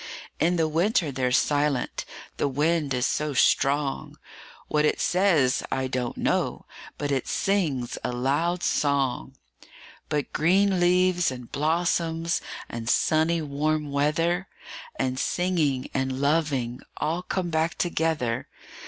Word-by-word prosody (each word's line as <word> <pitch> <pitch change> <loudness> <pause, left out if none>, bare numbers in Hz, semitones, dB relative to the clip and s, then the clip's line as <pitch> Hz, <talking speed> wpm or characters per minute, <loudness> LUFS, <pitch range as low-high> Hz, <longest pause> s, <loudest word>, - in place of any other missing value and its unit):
In 175 +2 +2
the 165 -2 +2
winter 165 0 +1
they're 130 -1 -1
silent 145 -1 +1 0.3
the - - +1
wind 150 +2 0
is 125 -1 +1
so 150 -2 -1
strong; 140 +2 +1 0.5
What 150 0 +1
it 150 - +1
says, 175 -9 +3
I 130 0 0
don't 125 -2 -3
know, - - -1 0.3
but 145 -1 -2
it 135 -2 -1
sings 155 -12 0
a - - -1
loud 145 +8 0
song. 135 - 0 0.7
But 150 -2 -2
green 190 +4 +3
leaves, 180 0 +3
and 125 -2 -8
blossoms, 165 +1 0 0.3
and 115 0 -5
sunny 160 +4 +2
warm 150 +1 -1
weather, 165 +6 +1 0.5
5 - - 0
And 130 0 -3
singing, 160 -8 0
and 130 -1 -1
loving 140 -5 0 0.2
all 165 +3 -1
come 180 -1 -3
back 160 +1 0
together. 160 -9 -1
150 Hz, 125 wpm, -26 LUFS, 135-170 Hz, 0.7 s, says